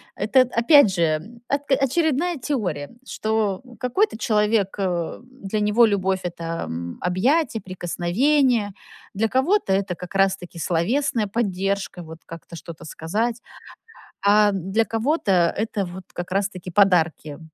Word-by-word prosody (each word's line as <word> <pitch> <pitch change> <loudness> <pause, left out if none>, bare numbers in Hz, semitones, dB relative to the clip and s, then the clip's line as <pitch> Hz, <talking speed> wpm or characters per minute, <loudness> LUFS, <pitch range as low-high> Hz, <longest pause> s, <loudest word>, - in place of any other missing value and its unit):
Это, 220 +6 +3
опять 240 - +5
же, 170 +6 -1
ак 280 0 0
очередная 310 +4 +1
теория, 200 - -3 0.2
что, 215 -3 -1
м, 245 -2 -15
какой-то 250 - 0
человек, 210 -3 +1
э, 175 -3 -2
для 220 -5 -5
него 210 +3 +4
любовь, 190 -3 0
это, 165 -1 -4
м, 85 +1 -6
объятия, 230 - +1
прикосновения. 205 - +1 0.4
Для 220 +3 +1
кого-то, 265 - +1
это 190 -2 -1
как 180 +2 -10
раз-таки 195 -3 0
словесная 215 - 0
поддержка, 195 -3 -2
вот 160 0 -11
как-то 165 +1 -10
что-то 165 -1 -10
сказать. 225 +10 -2 0.8
А 210 +1 +5
для 195 +4 0
кого-то 220 - +1
это 210 -2 -2
вот 180 +2 -9
как 175 +1 -6
раз 195 +1 +1
таки 180 -2 -9
подарки. 170 -6 +2
200 Hz, 130 wpm, -23 LUFS, 180-240 Hz, 0.8 s, опять